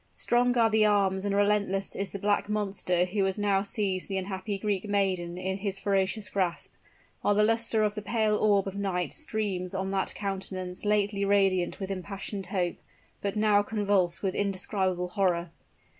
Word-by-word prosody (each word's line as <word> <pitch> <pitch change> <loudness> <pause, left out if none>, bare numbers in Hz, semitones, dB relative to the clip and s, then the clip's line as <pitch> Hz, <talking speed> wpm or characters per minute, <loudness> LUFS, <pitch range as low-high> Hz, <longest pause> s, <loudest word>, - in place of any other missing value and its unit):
Strong 245 +1 +1
are 225 -1 +4
the 220 0 +4
arms 200 -2 +2
and 200 -1 0
relentless 200 -1 +1
is 195 -1 -2
the - - -4
black 205 +1 0
monster 195 -4 0
who 195 +2 -1
has 190 +1 -1
now 200 -2 +2
seized 200 -2 -2
the 195 - -1
unhappy 190 +2 -3
Greek 205 0 -2
maiden 185 -4 0
in 190 +1 -2
his 195 -1 -2
ferocious 195 +1 0
grasp 185 -3 -2 0.5
while 205 - +2
the 210 - +4
luster 225 0 +2
of 210 -1 +1
the 210 - -5
pale 215 0 +1
orb 205 -2 +3
of 195 - -5
night 190 -3 -1
streams 200 - -3
on 190 0 -2
that 195 -1 -1
countenance 190 -2 -5
lately 205 -1 +1
radiant 195 -3 +2
with 195 -1 -4
impassioned 195 +1 -5
hope, 180 -2 -1 0.4
but 200 0 -2
now 210 -1 +4
convulsed 200 -4 0
with 190 -2 0
indescribable 190 -2 0
horror. 175 -3 0
195 Hz, 175 wpm, -28 LUFS, 190-210 Hz, 0.5 s, are